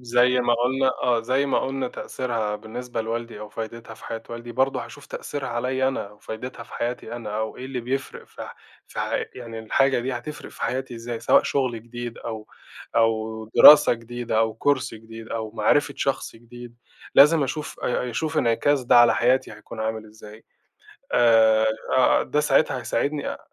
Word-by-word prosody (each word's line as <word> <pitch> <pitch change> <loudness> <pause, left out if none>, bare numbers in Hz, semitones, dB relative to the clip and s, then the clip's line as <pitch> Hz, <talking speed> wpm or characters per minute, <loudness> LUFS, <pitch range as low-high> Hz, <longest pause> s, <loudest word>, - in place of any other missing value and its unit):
زَي 125 +1 +3
ما 120 -1 +2
قُلنا 130 +3 +1
آه، 120 -2 +2
زَي 130 +4 +1
ما - - +1
قُلنا 135 -1 -2
تأثيرها 115 -6 -3
بالنسبة 120 +2 -6
لوالدي، 115 -1 -4
أو 105 - -7
فايدتها 115 +1 -7
في - - -16
حياة 115 0 -5
والدي، 120 0 -7
برضه 130 -1 0
هاشوف 145 +1 -13
تأثيرها 140 -3 -5
عليَّ 130 +2 0
أنا 105 -6 -4
و 105 - -19
فايدتها 115 +3 -7
في - - -16
حياتي 120 +1 -4
أنا، 105 -3 -5
أو 110 0 -3
إيه 125 - -8
اللي 130 -2 -4
بيفرق 130 +3 -4
في - - -10
ح - - -9 0.3
في - - -5
حي - - -1
يعني 115 -2 -8
الحاجة 135 +4 +2
دي 130 +2 -3
هتفرق 125 +5 -7
في - - -11
حياتي 130 -1 -2
إزاي؟ 115 0 -6
سواء - - +4
شُغل 125 -5 -1
جديد 120 0 -7
أو، 110 -2 -6 0.5
أو 110 -1 +1
دراسة 150 -4 +9
جديدة 120 -1 -3
أو 110 -1 0
course 140 -5 +2
جديد 115 0 -11
أو 110 -1 -4
معرفة 140 +7 +1
شخص 135 -4 -2
جديد، 120 +1 -12 0.4
لازم 150 +2 +7
أشوف 145 +3 -4
أ 125 0 -1
أشوف 155 +6 -2
انعكاس 125 +4 +2
ده 120 - +5
على 120 0 +7
حياتي 125 0 +2
هيكون 110 +1 -10
عامل 110 0 -3
إزاي 105 0 -14 0.7
آآ، 110 -2 +5 0.3
آآ، 130 - +4
ده 150 - 0
ساعتها 150 -2 +2
هيساعدني 145 +5 -2
أ - - -10
120 Hz, 180 wpm, -24 LUFS, 115-130 Hz, 0.7 s, دراسة